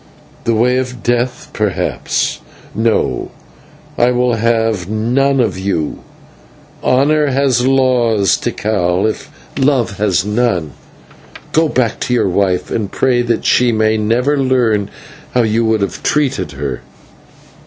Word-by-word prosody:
"The 115 - +1
way 125 +3 +2
of 125 -1 -5
death, 120 +1 -1
perhaps. - - -1 0.3
No, 110 0 0 0.7
I 120 - +4
will 125 0 +1
have 115 -4 0
none 125 +6 +1
of 105 -6 0
you. 95 -6 -2 0.8
Honour 150 +4 +3
has 130 -2 +1
laws, 120 -7 +2
Tikal, 95 -3 -1
if 110 - -4 0.3
love 130 -7 +1
has 100 -3 +1
none. 105 -8 0 0.8
Go 160 0 +2
back 120 -5 0
to 125 - -1
your 110 - +1
wife, 90 -1 0
and 105 -4 -2
pray 125 -2 +1
that 120 -2 -1
she 125 -1 +3
may 110 -1 +2
never 120 +7 +1
learn 120 -6 +1 0.5
how 125 - +4
you 110 +1 +1
would 110 -1 +1
have 100 -4 -3
treated 135 - 0
her." 70 -2 -4
115 Hz, 130 wpm, -15 LUFS, 105-125 Hz, 0.8 s, I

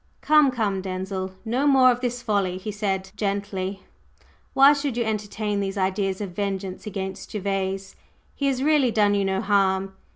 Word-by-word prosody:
"Come, 300 -2 +5
come, 210 -6 -1
Denzil. 190 0 -4
No 250 +6 +1
more 260 -2 +6
of 245 0 -3
this 245 -1 -3
folly," 195 -4 0
he 210 +3 -5
said, 195 -2 -2
gently. 200 -2 -3 0.7
"Why 275 +2 +8
should 280 -4 -2
you 240 - +1
entertain 210 -1 -2
these 195 0 -3
ideas 190 0 0
of 200 -3 -4
vengeance 195 +1 -4
against 195 -2 -5
Gervase? 195 -1 -3 0.4
He 280 - -1
has 265 -1 0
really 295 -4 +4
done 210 -2 +3
you 200 -1 +1
no 190 0 0
harm. 195 -1 +1
200 Hz, 165 wpm, -24 LUFS, 190-235 Hz, 0.7 s, Why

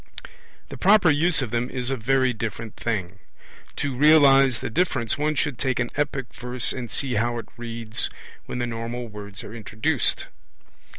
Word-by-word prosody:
The - - -9
proper 200 -4 +6
use 155 0 +2
of 115 - -5
them 120 +1 -1
is 125 0 -3
a - - +1
very 130 +2 +2
different 110 -1 -5
thing. 95 -5 -3 0.6
To 140 -2 -2
realize 135 -3 +6
the - - -4
difference 130 -7 0
one 150 +1 0
should 140 -3 -1
take 130 -2 0
an 125 - -1
epic 140 -3 -2
verse 125 0 -1
and 120 -3 -5
see 130 +1 0
how 120 +2 0
it 115 - -7
reads 115 -1 -2 0.4
when - - -4
the 120 - -1
normal 120 +1 -4
words 105 -2 -9
are 110 - -9
introduced. 110 -1 -1
125 Hz, 170 wpm, -24 LUFS, 115-135 Hz, 0.6 s, proper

